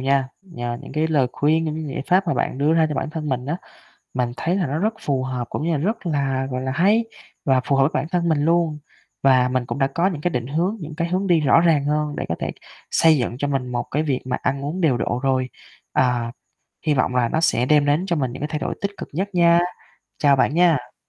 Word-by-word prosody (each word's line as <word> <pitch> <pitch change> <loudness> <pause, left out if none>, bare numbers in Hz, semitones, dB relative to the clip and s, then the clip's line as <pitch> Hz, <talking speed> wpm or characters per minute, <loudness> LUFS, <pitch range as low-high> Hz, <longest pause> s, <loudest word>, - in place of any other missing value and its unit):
nha. 135 0 +1
Nhờ 120 -10 -5
những - - -10
cái 155 +2 +1
lời 145 -5 +2
khuyên, 160 +3 +2
những 155 -1 -2
cái 160 0 -4
giải - - -3
pháp 185 +2 +3
mà 170 - +1
bạn - - -1
đưa 145 +3 +3
ra 160 -1 +4
cho 150 - -3
bản 150 - -2
thân 155 -2 -4
mình 125 0 -2
á, 160 +4 -1 0.6
mình 125 -2 -1
thấy 175 +3 0
là 185 - 0
nó 145 +3 -2
rất 215 +4 0
phù 135 -3 -1
hợp 125 -2 -3
cũng - - -3
như 165 +2 0
là 155 - +1
rất 205 +4 -2
là 135 -4 0
gọi 125 0 -3
là 130 0 -2
hay 200 - +3 0.4
và 130 -2 +3
phù 140 - +1
hợp 135 - +4
với 135 - +3
bản - - 0
thân 175 -2 0
mình 150 -2 +2
luôn. 165 -2 +2 0.4
Và 130 -2 +4
mình 125 -1 -1
cũng 140 - -4
đã 135 - +3
có 170 +7 0
những 170 -7 -2
cái 175 - 0
định 125 -6 -2
hướng, 170 - -1
những 155 -1 -7
cái 170 +2 -2
hướng 185 +3 -1
đi 175 -3 +4
rõ 150 +2 +5
ràng 160 -5 +3
hơn 150 0 -1
để - - -3
có 80 - 0
thể - - -2 0.4
xây 160 -1 +5
dựng 120 -3 -2
cho 145 - -1
mình 135 -3 -1
một 120 - -1
cái 150 +3 0
việc 135 -5 -1
mà 130 - -2
ăn 140 0 -1
uống 160 +6 -3
điều 155 -8 +3
độ 120 +1 -1
rồi. 130 -2 +1 0.4
À, 120 -2 +1 0.5
hy 155 - +3
vọng 130 -2 0
là 120 -2 +2
nó 160 - 0
sẽ 125 -7 +2
đem 150 +1 +4
đến 145 +5 +2
cho 180 -3 0
mình 130 -6 -1
những 130 - -8
cái 150 - -1
thay 150 0 -3
đổi - - -3
tích 200 - -1
cực - - -7
nhất 190 +6 -2
nha. 170 -1 +5 0.6
Chào 145 -3 +5
bạn 135 - +2
nha. 160 -8 +2
150 Hz, 270 wpm, -22 LUFS, 130-165 Hz, 0.6 s, rõ